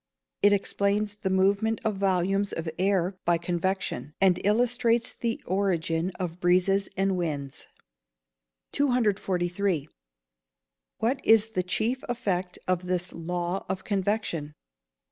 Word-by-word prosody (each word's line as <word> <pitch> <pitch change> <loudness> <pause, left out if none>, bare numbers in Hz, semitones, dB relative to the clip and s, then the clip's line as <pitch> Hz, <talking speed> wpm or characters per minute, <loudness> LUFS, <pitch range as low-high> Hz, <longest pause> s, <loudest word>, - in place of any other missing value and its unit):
_ - - -61 0.4
It 205 - +6
explains 205 +1 +1
the 205 -2 -3
movement 200 +4 +2
of 220 - +2
volumes 195 +1 +1
of 165 0 -4
air 190 -1 +1
by 175 0 +3
convection, 170 -5 -2
and 185 -2 +3
illustrates 235 +2 +2
the 230 -1 -3
origin 175 -3 0
of 175 -1 -4
breezes 185 +3 +2
and 195 0 +2
winds. 145 -6 -3 1.0
243. 195 - +1 1.2
_What 250 +4 +2
is 225 0 +5
the 185 -4 0
chief 225 +8 -1
effect 190 -7 -1
of 180 0 0
this 180 0 -1
law 175 +2 -3
of 190 0 -3
convection? 195 -7 -1
190 Hz, 120 wpm, -27 LUFS, 175-205 Hz, 1.2 s, It